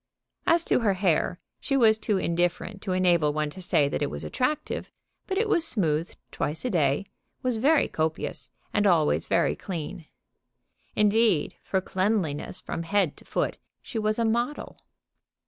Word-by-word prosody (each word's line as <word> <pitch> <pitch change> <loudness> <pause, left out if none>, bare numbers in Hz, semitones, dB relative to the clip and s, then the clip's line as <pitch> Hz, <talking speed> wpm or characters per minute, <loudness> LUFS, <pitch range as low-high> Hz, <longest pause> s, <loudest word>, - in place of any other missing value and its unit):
As 335 0 +4
to - - +2
her 210 -5 +2
hair, 180 -2 +1 0.2
she 275 - 0
was 220 -3 +5
too 210 -2 0
indifferent 175 +3 -1
to 195 - -3
enable 175 -5 +3
one 150 0 -1
to 185 - -10
say 150 -5 +2
that 145 - -3
it 145 - 0
was - - -4
attractive; 265 +4 -2 0.4
but 385 - -2
it 440 +2 +2
was 345 -6 +3
smoothed 170 - +2
twice 155 +10 -2
a 250 - 0
day, 150 0 +1 0.4
was 250 -3 +1
very 285 +6 +3
copious, 160 0 -3 0.2
and 205 -1 +3
always 165 -5 +2
very 170 - +2
clean. 170 -2 -6 0.9
Indeed, 210 -5 +3
for 190 - -1
cleanliness 185 -5 -1
from - - -5
head 180 -2 +1
to - - -9
foot - - -2 0.2
she 230 - -4
was 215 0 0
a 230 - +1
model. 240 +6 -2
190 Hz, 165 wpm, -26 LUFS, 165-225 Hz, 0.9 s, was